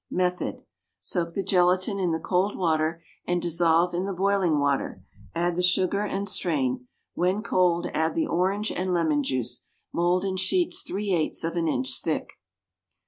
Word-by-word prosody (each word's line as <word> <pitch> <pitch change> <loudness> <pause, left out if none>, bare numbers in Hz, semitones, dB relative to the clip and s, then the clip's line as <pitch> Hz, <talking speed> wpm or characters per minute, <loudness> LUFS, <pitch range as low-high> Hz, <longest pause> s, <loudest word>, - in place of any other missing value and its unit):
Method. 180 0 -1 0.4
Soak 170 -2 -2
the 195 - -1
gelatine 185 +1 +2
in 180 -3 +1
the 160 - +1
cold 185 +4 0
water 165 -1 0 0.2
and 175 0 +1
dissolve 170 0 +2
in 180 +2 -1
the 195 -1 -3
boiling 190 -4 +2
water; 140 -9 0 0.3
add 175 0 0
the 180 - 0
sugar 185 +2 +2
and 200 -1 -2
strain; 130 -9 0 0.3
when 185 +4 0
cold 175 -4 +2
add 160 +1 0
the 325 - +1
orange 195 - 0
and 185 0 -1
lemon 160 -4 +2
juice. 130 -4 -2 0.3
Mould 175 +2 +2
in 190 -1 -1
sheets 345 - +1
three 200 +1 -3
eighths 160 -1 0
of 165 +1 -2
an 170 -1 0
inch 260 +11 -1
thick. - - -2
180 Hz, 165 wpm, -26 LUFS, 165-190 Hz, 0.4 s, gelatine